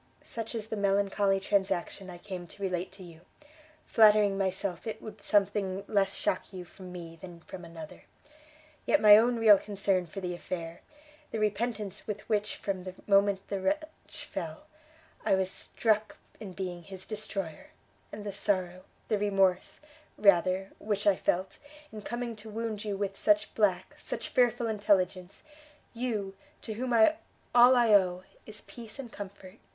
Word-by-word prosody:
Such 225 0 -6
is 220 -1 -5
the - - -2
melancholy 200 -1 +2
transaction 190 -1 -1
I 175 - -8
came 180 -1 -7
to 200 - -10
relate 180 -1 -2
to 190 -1 -11
you, 170 -2 -13 0.6
flattering 210 -2 +5
myself 190 -1 -2
it 220 - -4
would 215 -1 -10
something 195 -1 +1
less 195 -2 +1
shock 185 - -2
you 185 -2 -7
from 185 +1 -12
me 170 -2 -8
than 175 -2 -10
from 180 +1 -10
another: 165 -2 -10 0.8
yet 300 - +4
my 210 -1 +9
own 235 +3 +4
real 215 -3 +7
concern 195 -3 0
for 165 - -7
the 180 -2 -3
affair, 170 -1 -6 0.5
the - - -4
repentance 215 -1 -2
with 210 -1 -5
which 210 -1 0
from 190 -2 -4
the 185 0 -7
moment 200 -1 +3
the 200 - -2
wretch 310 +7 -3
fell, 160 -2 -6 0.6
I - - +3
was 190 0 0
struck 215 -1 0 0.2
in 195 -4 -8
being 180 -2 -5
his 190 +1 -9
destroyer, 195 -6 -5 0.4
and 210 - -7
the 200 - -4
sorrow, 185 -2 -1 0.2
the 210 - +1
remorse, 195 -3 +1 0.4
rather, 190 -1 +3
which 205 -1 -2
I 200 -2 +5
felt, 185 +1 -1 0.3
in 215 - -8
coming 240 +1 -4
to 215 +1 -10
wound 220 -1 -4
you 205 -2 -3
with 195 -1 -2
such 210 +1 +2
black, 200 -5 +1
such - - -4
fearful 240 -1 +2
intelligence, 195 -4 0 0.5
you 225 -5 -2 0.3
to 220 - -4
whom 250 +3 -3 0.6
all 245 +1 +8
I 235 -3 +4
owe 185 -2 +4 0.2
is 215 -1 -8
peace 230 -1 -10
and 255 -4 -7
comfort! 200 0 -10
200 Hz, 160 wpm, -30 LUFS, 185-215 Hz, 0.8 s, my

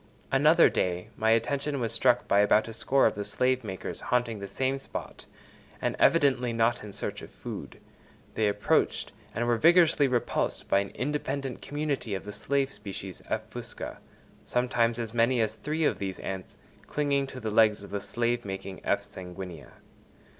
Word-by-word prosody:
Another 150 +5 +6
day 90 -1 -1
my 110 - +1
attention 140 +5 +1
was 115 -2 -1
struck 120 +2 +3
by 100 - +4
about 105 +2 +4
a 115 - -6
score 135 +4 +2
of - - +4
the 105 - -4
slave 125 +5 +1
makers 95 -3 -5
haunting 120 -3 0
the 100 - -5
same 130 +7 -1
spot, - - -8 0.5
and - - -1
evidently 135 -7 +4
not 115 +1 +1
in 105 - -8
search - - -5
of - - -10
food; - - -8 0.5
they 110 - +2
approached 105 0 +1 0.2
and 120 - 0
were 120 -1 +2
vigorously 165 -1 +5
repulsed 125 -2 -1
by 100 - +4
an 100 0 -2
independent 135 -1 -2
community 145 -8 -2
of 95 - -6
the 105 - -6
slave 135 +5 0
species 95 -4 -7
(F. - - -2
fusca); - - -7 0.4
sometimes 120 -2 +1
as 115 -2 -4
many 120 +2 +3
as 110 -1 +1
three 155 +7 -2
of - - +2
these 95 -1 -3
ants 95 -1 -6 0.3
clinging 140 -2 0
to 130 - -8
the 110 -3 -3
legs 105 -2 +4
of 100 - -11
the 100 - -2
slave 120 +3 -1
making 95 -1 -6
F. 100 0 +1
sanguinea. 90 -7 -9
115 Hz, 175 wpm, -28 LUFS, 100-135 Hz, 0.5 s, Another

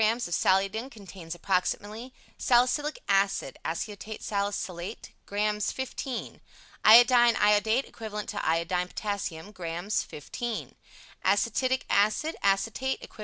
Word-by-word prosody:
xx 225 +1 +2
of 175 - -5
Saliodin 195 +8 +1
contains 190 -7 -9
approximately: 205 +6 -2 0.2
Salicylic 255 +5 +2
Acid, 195 -8 +1
(Aceto 210 +6 -5
Salicylate), 200 -3 -4 0.2
Grs. 210 0 0
xv 260 -1 -5 0.4
Iodine 240 +1 +7
(Iodate) 210 +5 +3
Equivalent 210 -2 -6
to 210 - -3
Iodide 170 +2 0
Potass, 205 -2 -2 0.2
Grs. 175 +2 -2
xv 230 - -5 0.5
Acetic 255 +5 +1
Acid 215 +11 +2
(Acetate) 225 +7 +1
Equiv. - - -21
210 Hz, 105 wpm, -28 LUFS, 195-235 Hz, 0.5 s, Iodine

